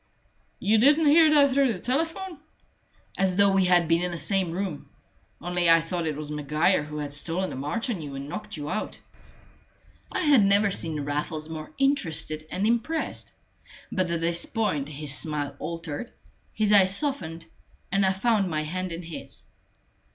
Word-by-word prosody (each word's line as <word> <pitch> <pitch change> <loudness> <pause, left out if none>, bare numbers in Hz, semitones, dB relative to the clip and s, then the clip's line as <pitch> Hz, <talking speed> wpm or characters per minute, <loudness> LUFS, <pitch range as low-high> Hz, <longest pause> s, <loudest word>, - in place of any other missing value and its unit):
"You 215 +3 +2
didn't 295 +6 +5
hear 315 +2 +6
that 285 -3 +5
through 270 -3 +3
the 185 - -7
telephone?" 325 - -2 0.8
"As 190 -1 +2
though 200 0 +4
we 190 -1 +3
had 175 -2 +4
been 165 +1 +3
in 180 - 0
the 170 - -5
same 185 +3 0
room: 180 -4 -4 0.5
only 175 0 0
I 165 0 +7
thought 165 0 -3
it 155 - -2
was 150 -1 -6
Maguire 150 +5 +1
who 150 0 -7
had 145 -1 -4
stolen 170 +6 0
a - - -6
march 150 - -3
on 190 -8 -4
you 145 -2 -7
and 135 +1 -6
knocked 145 - -5
you 145 -1 -5
out." - - -4 1.1
I - - -1
had 290 - +5
never 200 +1 +4
seen 160 -5 -2
Raffles 150 +2 -3
more 155 -1 -7
interested 165 - -1
and 190 +5 -1
impressed; 235 +8 -1 0.6
but 185 -2 0
at 170 -1 -1
this 170 +1 -1
point 150 - -1
his 150 -1 -3
smile 145 -3 -1
altered, 165 +5 -5 0.4
his 210 -1 +1
eyes 195 -1 +5
softened, 170 - -3 0.5
and 195 +1 +2
I 190 - +3
found 200 0 +1
my 155 -2 -1
hand 185 +3 -4
in 170 +1 -6
his. 165 -1 -9
180 Hz, 175 wpm, -26 LUFS, 155-215 Hz, 1.1 s, I